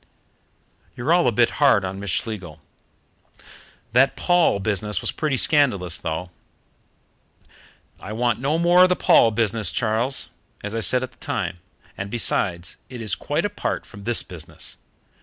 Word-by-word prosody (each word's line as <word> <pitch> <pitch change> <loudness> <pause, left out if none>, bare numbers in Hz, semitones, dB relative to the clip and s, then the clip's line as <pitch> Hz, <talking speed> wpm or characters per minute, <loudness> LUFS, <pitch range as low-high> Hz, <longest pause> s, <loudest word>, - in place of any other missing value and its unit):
You're 130 +8 +1
all 175 -6 +3
a - - +4
bit 120 +1 +2
hard 100 -9 +5
on 95 +1 -5
Miss 100 0 -5
Schlegel." 90 -5 -4 1.3
"That 135 +3 +4
Paul 175 - +2
business 105 -1 0
was - - -1
pretty 150 -4 -1
scandalous, 110 - +2
though." 80 +3 -4 1.7
"I 95 - -8
want 120 +1 0
no 140 +5 0
more 175 +2 +4
of 185 - +7
the 180 - +3
Paul 115 - +5
business, 110 -3 0
Charles, 115 +5 0 0.3
as 105 +1 -5
I 115 - -1
said 125 +5 +1
at 130 - -6
the - - -27
time, 85 - -3 0.4
and 95 +1 -5
besides, 90 -6 -1
it 125 -1 -8
is 110 -4 -3
quite 150 +6 -1
apart 205 0 -3
from 100 -2 -13
this 120 -1 +2
business. 85 -4 -4
115 Hz, 155 wpm, -22 LUFS, 100-135 Hz, 1.7 s, of